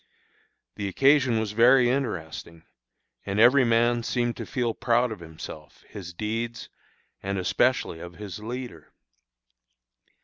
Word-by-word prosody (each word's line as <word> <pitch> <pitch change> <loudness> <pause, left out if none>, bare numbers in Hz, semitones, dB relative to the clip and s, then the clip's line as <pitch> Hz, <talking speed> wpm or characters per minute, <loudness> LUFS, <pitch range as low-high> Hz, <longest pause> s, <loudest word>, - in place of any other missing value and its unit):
The 100 - -3
occasion 130 +2 +3
was 110 -2 -2
very 120 +3 +5
interesting, 85 - -3 0.6
and 100 +1 -2
every 130 +4 +6
man 120 0 +2
seemed 120 0 -1
to - - -6
feel 120 -3 -1
proud 120 +1 +1
of 110 - -6
himself, 80 -2 -11
his 90 -4 -8
deeds, 115 +5 -4 0.5
and 100 0 -3
especially 110 -1 +1
of 85 0 -9
his 100 -1 -8
leader. 115 - -7
115 Hz, 125 wpm, -26 LUFS, 95-120 Hz, 0.6 s, every